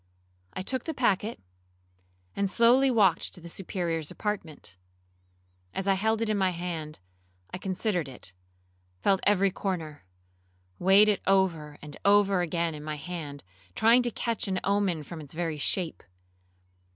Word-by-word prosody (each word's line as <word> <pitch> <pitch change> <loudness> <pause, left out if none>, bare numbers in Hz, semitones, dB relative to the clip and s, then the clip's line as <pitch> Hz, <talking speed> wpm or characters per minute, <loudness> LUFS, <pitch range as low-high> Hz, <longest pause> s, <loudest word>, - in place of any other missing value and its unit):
I 185 - -4
took 260 +4 -2
the 320 - -4
packet, 220 -2 +1 1.0
and 200 -1 0
slowly 245 +6 +5
walked 200 -8 +2
to - - -7
the 170 - -10
Superior's 170 -3 -3
apartment. 170 - -5 1.0
As 195 - -2
I 195 - +5
held 220 +3 +1
it 225 - -2
in 210 - 0
my 190 -1 +3
hand, 170 -3 -5 0.6
I 185 - -4
considered 185 - -1
it, 95 -7 -9 0.7
felt 195 -1 +3
every 195 -1 +3
corner, 165 - -4 0.8
weighed 195 +3 +6
it 210 -2 +2
over 170 -7 +1
and 150 -1 -9
over 200 -2 +4
again 170 -1 -1
in 150 -1 -8
my 155 0 -4
hand, 150 -3 -6 0.3
tried 235 +3 +5
to - - +1
catch 230 -1 -2
an 190 -1 0
omen 195 -5 +1
from 160 +2 -8
its 145 - -9
very 165 -2 -2
shape. 170 +3 -1
185 Hz, 150 wpm, -28 LUFS, 165-205 Hz, 1.0 s, weighed